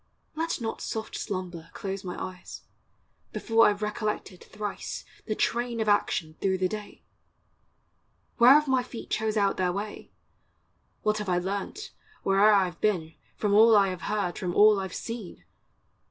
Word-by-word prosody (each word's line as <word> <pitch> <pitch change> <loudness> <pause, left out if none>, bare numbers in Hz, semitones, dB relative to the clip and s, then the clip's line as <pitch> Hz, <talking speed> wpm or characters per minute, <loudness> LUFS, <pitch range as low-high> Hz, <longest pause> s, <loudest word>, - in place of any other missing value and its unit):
Let 330 +1 -2
not 225 -2 -4
soft 220 -1 -4
slumber 180 -5 -5
close 195 0 -4
my 180 -1 -5
eyes, 185 -1 -8 0.7
Before 225 0 +4
I 210 - +3
've 205 - -7
recollected 210 -3 -3
thrice 210 -2 -6 0.2
The 215 - -1
train 235 +1 -1
of 220 - -1
action 175 -6 +1
through 190 -1 +1
the 185 0 +1
day! 210 +1 -8 1.3
Where 240 +2 +8
have 300 +1 +4
my 260 -1 +3
feet 245 -2 -9
chose 220 0 0
out 200 -1 +2
their 180 -1 +1
way? 205 +3 -6 0.9
What 215 0 +1
have 210 -2 -4
I 180 - +2
learnt, 200 - -4 0.3
where'er 195 +2 +5
I 195 -3 +3
've 170 - -22
been, 175 -7 0 0.2
From 205 -2 0
all 220 +2 +7
I 200 -1 +4
have 185 -1 -5
heard, 205 -4 -1
from 180 -2 -3
all 210 -1 +6
I 190 - -3
've 185 - -10
seen? 225 -5 -7
205 Hz, 170 wpm, -27 LUFS, 185-220 Hz, 1.3 s, Where